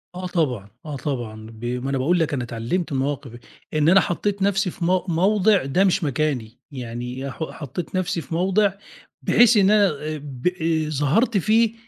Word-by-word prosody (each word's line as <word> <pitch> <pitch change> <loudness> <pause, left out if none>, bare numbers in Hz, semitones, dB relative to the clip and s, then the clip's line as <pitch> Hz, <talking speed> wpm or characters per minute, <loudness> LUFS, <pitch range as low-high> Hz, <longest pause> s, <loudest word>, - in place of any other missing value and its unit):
آه 185 0 -4
طبعًا، 130 - -1 0.2
آه 150 -2 -5
طبعًا، 120 -5 -4
ب 110 +1 -9
ما 125 +2 -2
أنا 135 - 0
باقول 165 +8 +2
لك 160 -2 0
أنا 130 -3 -1
اتعلّمت 120 +10 -3
المواقف 135 -1 -2 0.4
إن 155 +1 +3
أنا 190 +3 +7
حطّيت 200 +4 -2
نَفْسي 195 -1 +1
في 170 - -4
مو 185 +1 +2
موضِع 195 +2 +3
ده 155 +8 +2
مش 190 -2 +2
مكاني، 135 -6 -1
يعني 125 +1 -5
ح 160 - -5
حطّيت 155 +5 -6
نَفْسي 180 -2 -1
في 160 - -9
موضِع 190 +3 +2 0.5
بحيث 240 -1 +5
إن 200 0 +5
أنا 210 -1 +5
آآ 155 -1 -4
ب 140 -1 -5
آآ 160 -3 0
ظهرت 155 - +2
فيه 220 +4 +3
155 Hz, 180 wpm, -23 LUFS, 135-185 Hz, 0.5 s, أنا